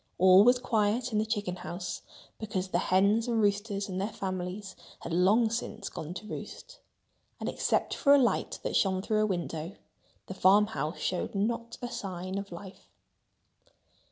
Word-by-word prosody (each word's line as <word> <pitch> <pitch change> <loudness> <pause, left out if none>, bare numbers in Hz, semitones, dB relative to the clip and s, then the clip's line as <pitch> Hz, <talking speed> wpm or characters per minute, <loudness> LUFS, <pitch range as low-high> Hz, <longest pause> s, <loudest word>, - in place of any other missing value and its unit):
All 185 +2 +7
was 245 +2 +6
quiet 235 0 0
in 210 - +1
the 215 - 0
chicken 205 -5 -2
house 175 0 -5 0.4
because 195 -4 -3
the 175 - +1
hens 200 +5 +3
and 230 -2 +1
roosters 205 -1 0
and 190 -1 -3
their 200 - 0
families 190 -1 -5 0.3
had 165 - -5
long 210 +6 +4
since 225 -1 -4
gone 160 +3 -7
to 210 - -7
roost. - - -8 0.6
And - - -4
except - - 0
for 280 - +3
a 285 - +9
light 255 -4 +1
that - - -2
shone 190 -1 +2
through 215 0 +1
a 215 - +2
window, 170 -1 -3 0.5
the - - -6
farmhouse 190 -3 +3
showed 185 +2 -2
not 230 +3 -2
a - - -1
sign 190 -5 -4
of 200 -1 -8
life. 185 +2 -10
200 Hz, 165 wpm, -29 LUFS, 185-220 Hz, 0.6 s, a